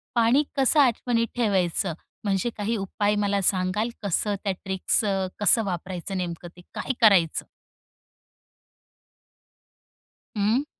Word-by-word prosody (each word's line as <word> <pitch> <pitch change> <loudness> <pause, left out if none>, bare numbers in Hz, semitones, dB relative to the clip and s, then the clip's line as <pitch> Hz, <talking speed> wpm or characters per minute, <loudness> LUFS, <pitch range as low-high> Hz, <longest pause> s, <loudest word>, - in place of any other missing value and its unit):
पाणी 235 +5 +4
कसं 275 +3 +3
आठवणीत 235 -3 +2
ठेवायचं? 190 -6 +1 0.3
म्हणजे 200 +2 0
काही 215 +2 -1
उपाय 205 +1 -1
मला 200 0 +1
सांगाल, 185 +4 -1
कसं 205 +2 0
त्या 195 -2 0
ट्रिक्स 190 +2 0
अ, 195 -2 0
कसं 215 +2 +4
वापरायचं, 185 +1 -4
नेमकं 175 -1 -5
ते - - -12
काय 265 - -3
करायचं? 190 -8 +4 2.9
हं. 225 +8 +1
200 Hz, 110 wpm, -25 LUFS, 185-230 Hz, 2.9 s, पाणी